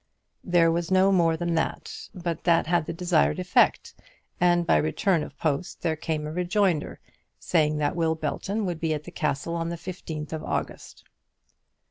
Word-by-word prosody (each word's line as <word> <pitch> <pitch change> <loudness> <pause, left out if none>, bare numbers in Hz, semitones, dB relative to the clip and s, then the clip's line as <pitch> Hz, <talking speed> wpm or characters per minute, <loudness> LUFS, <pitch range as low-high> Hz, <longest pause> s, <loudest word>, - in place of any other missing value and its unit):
There 170 -2 +4
was 170 0 -1
no 190 +1 +4
more 165 -4 +3
than 170 0 -1
that, 160 - -2 0.2
but 170 -3 -4
that 170 -1 +3
had 170 -1 +1
the - - -2
desired 175 0 +1
effect; 180 0 +2 0.5
and 175 -1 +3
by - - +4
return 160 +3 +1
of 140 - -8
post 155 +2 -2
there 160 -2 +1
came 155 -1 -3
a 150 - -4
rejoinder, 180 -1 0 0.4
saying 155 -3 +1
that 150 +1 0
Will 165 -2 +1
Belton 195 +7 -2
would 175 -3 -3
be 160 -1 0
at 150 - -6
the - - -10
Castle 150 +2 -2
on 165 0 -2
the 170 - -4
fifteenth 165 -3 -6
of 160 - -4
August. - - -5
165 Hz, 175 wpm, -26 LUFS, 155-175 Hz, 0.5 s, There